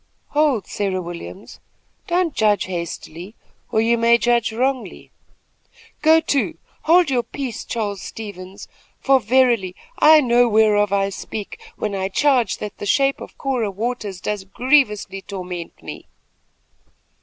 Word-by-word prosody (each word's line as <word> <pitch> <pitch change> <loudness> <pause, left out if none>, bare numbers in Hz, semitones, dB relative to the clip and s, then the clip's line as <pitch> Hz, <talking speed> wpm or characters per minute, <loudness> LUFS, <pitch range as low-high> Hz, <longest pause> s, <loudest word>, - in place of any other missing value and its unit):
"Hold, 290 -9 +1
Sarah 195 -2 -2
Williams! 175 +3 -9 0.5
Don't 350 -3 +1
judge 210 -4 +2
hastily, 175 +2 -6 0.4
or 220 - +2
you 235 +1 +2
may 235 +1 +5
judge 235 -1 +1
wrongly." 255 +3 -3 0.9
"Go 320 +1 +6
to! 285 -3 -1 0.3
hold 335 -2 +5
your 250 -2 +2
peace, 240 0 -6
Charles 205 -4 -3
Stevens, 195 -3 -9 0.3
for, 270 0 +4
verily, 235 -5 +2 0.2
I 310 +1 +8
know 245 -3 +3
whereof 210 -2 +3
I 195 0 +1
speak, 200 +1 -7
when 210 -1 -3
I 190 -1 -2
charge 250 -2 +2
that 210 -1 -7
the 205 - -5
shape 275 +4 +2
of - - -10
Cora 255 -6 -1
Waters 210 -2 -4
does 210 -2 -3
grievously 210 -3 +1
torment 180 -3 -7
me." - - -9
220 Hz, 130 wpm, -21 LUFS, 195-260 Hz, 0.9 s, I